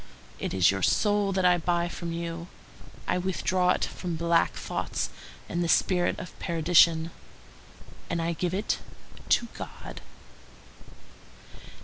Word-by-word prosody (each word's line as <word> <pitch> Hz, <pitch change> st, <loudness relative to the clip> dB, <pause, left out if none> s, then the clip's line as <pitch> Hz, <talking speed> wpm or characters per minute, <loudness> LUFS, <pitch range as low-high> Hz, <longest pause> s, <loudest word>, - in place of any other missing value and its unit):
It -, -, -3 dB
is 95 Hz, -1 st, +4 dB
your 95 Hz, 0 st, -3 dB
soul 205 Hz, -, +2 dB
that 185 Hz, -1 st, +1 dB
I 180 Hz, -1 st, +5 dB
buy 170 Hz, +1 st, +1 dB
from 170 Hz, 0 st, -5 dB
you; 170 Hz, 0 st, -4 dB, 0.6 s
I -, -, +1 dB
withdraw 185 Hz, 0 st, +1 dB
it -, -, +2 dB
from 175 Hz, -2 st, -5 dB
black 170 Hz, +1 st, +2 dB
thoughts -, -, -3 dB, 0.4 s
and 175 Hz, 0 st, -1 dB
the -, -, 0 dB
spirit 180 Hz, +1 st, +3 dB
of 180 Hz, -, -8 dB
perdition, 165 Hz, 0 st, +4 dB, 1.0 s
and 170 Hz, -, -1 dB
I 165 Hz, +1 st, 0 dB
give 180 Hz, +2 st, -1 dB
it 205 Hz, +2 st, -1 dB, 0.5 s
to 235 Hz, -, +3 dB
God." -, -, -8 dB
170 Hz, 130 wpm, -28 LUFS, 165-180 Hz, 1.0 s, I